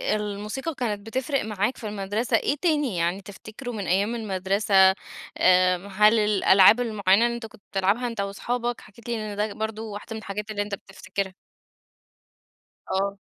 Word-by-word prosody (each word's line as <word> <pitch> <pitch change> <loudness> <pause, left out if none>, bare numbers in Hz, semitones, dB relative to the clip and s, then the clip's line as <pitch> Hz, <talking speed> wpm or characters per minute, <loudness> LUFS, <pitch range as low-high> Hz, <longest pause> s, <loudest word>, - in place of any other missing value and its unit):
الموسيقى 210 +9 -4
كانت 210 -5 -3
بتفرق 260 +2 -1
معاك 210 +3 -1
في 220 - -6
المدرسة 205 +3 0
إيه 285 - 0
تاني 295 - +1
يعني 175 +4 0
تفتكره 215 +6 -9
من 205 -4 -5
أيام 200 +6 +1
المدرسة، 200 -1 -1 0.6
آآ، 185 0 +5
هل 210 +3 +4
الألعاب 210 +1 +6
المُعينة 215 -2 +3
اللي 235 0 0
أنت 235 -1 -6
كنت 210 - -14
بتلعبها 200 +6 +1
أنت 230 -4 -3
وأصحابك؟ 240 +4 -3
حكيت 235 +4 -14
لي 215 -3 -3
إن - - -7
ده 210 0 -1
برضو 220 -1 -5
واحدة 210 +2 -7
من - - -5
الحاجات 210 0 -5
اللي 205 -1 -2
أنت 205 0 -3
بتفتكرها. 190 0 -6 1.6
آه. 195 +1 -1
210 Hz, 160 wpm, -25 LUFS, 195-230 Hz, 1.6 s, الألعاب